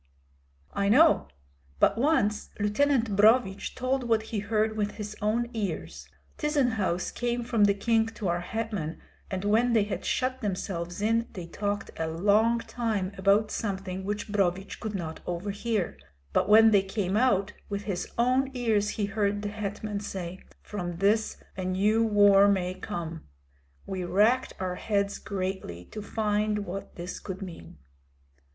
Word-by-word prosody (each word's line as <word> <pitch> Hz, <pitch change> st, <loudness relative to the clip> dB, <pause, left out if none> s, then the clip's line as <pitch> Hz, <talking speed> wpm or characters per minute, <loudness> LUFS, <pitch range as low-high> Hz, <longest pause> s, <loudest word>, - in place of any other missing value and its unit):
"I 200 Hz, 0 st, +1 dB
know. 310 Hz, +9 st, +5 dB, 0.5 s
But -, -, +4 dB
once 225 Hz, -5 st, +1 dB
Lieutenant 225 Hz, +1 st, +2 dB
Brohvich 210 Hz, -1 st, +3 dB
told 255 Hz, +1 st, 0 dB
what 225 Hz, -2 st, +2 dB
he 215 Hz, -, +1 dB
heard 215 Hz, +1 st, 0 dB
with 210 Hz, -1 st, -1 dB
his 210 Hz, -1 st, -6 dB
own 235 Hz, +3 st, 0 dB
ears. 210 Hz, -4 st, -4 dB, 0.3 s
Tyzenhauz 245 Hz, -, 0 dB
came 240 Hz, 0 st, -1 dB
from 230 Hz, -3 st, +3 dB
the 200 Hz, -1 st, +3 dB
king 225 Hz, +2 st, +2 dB
to 225 Hz, -3 st, -5 dB
our 175 Hz, 0 st, +1 dB
hetman, 205 Hz, -4 st, -4 dB, 0.3 s
and 190 Hz, +1 st, -3 dB
when 230 Hz, +4 st, +3 dB
they 220 Hz, -3 st, +4 dB
had 205 Hz, -, -4 dB
shut 260 Hz, 0 st, -1 dB
themselves 180 Hz, -2 st, -3 dB
in 230 Hz, +2 st, +2 dB
they 180 Hz, -3 st, -6 dB
talked 205 Hz, +3 st, -3 dB
a 160 Hz, -, -1 dB
long 210 Hz, +8 st, +3 dB
time 220 Hz, -7 st, -2 dB
about 200 Hz, +3 st, +3 dB
something 190 Hz, -3 st, -3 dB
which 205 Hz, +1 st, -3 dB
Brohvich 195 Hz, -1 st, 0 dB
could 215 Hz, -2 st, -4 dB
not 160 Hz, -4 st, -4 dB
overhear; 200 Hz, -, -2 dB, 0.3 s
but -, -, +2 dB
when 220 Hz, +1 st, +8 dB
they 200 Hz, -2 st, +5 dB
came 195 Hz, 0 st, -2 dB
out, 210 Hz, -4 st, +2 dB, 0.2 s
with 200 Hz, 0 st, -3 dB
his 190 Hz, -4 st, -3 dB
own 255 Hz, +3 st, +2 dB
ears 220 Hz, -4 st, +1 dB
he 210 Hz, -, +1 dB
heard 205 Hz, 0 st, -1 dB
the 205 Hz, -, -2 dB
hetman 210 Hz, 0 st, -4 dB
say, 185 Hz, -3 st, -5 dB, 0.2 s
'From 175 Hz, -4 st, -5 dB
this 210 Hz, +4 st, +2 dB, 0.2 s
a 185 Hz, -, -4 dB
new 205 Hz, +5 st, +2 dB
war 205 Hz, -2 st, +6 dB
may 185 Hz, -2 st, +1 dB
come.' 170 Hz, -4 st, -5 dB, 0.6 s
We 185 Hz, -1 st, -4 dB
racked 215 Hz, +8 st, +3 dB
our 185 Hz, -1 st, -2 dB
heads 200 Hz, -1 st, -1 dB
greatly 185 Hz, -, -4 dB
to 215 Hz, -, -6 dB
find 210 Hz, -1 st, 0 dB
what 195 Hz, +2 st, -6 dB
this 175 Hz, +1 st, -6 dB
could 190 Hz, 0 st, -6 dB
mean." 175 Hz, -, -10 dB
205 Hz, 155 wpm, -28 LUFS, 190-225 Hz, 0.6 s, when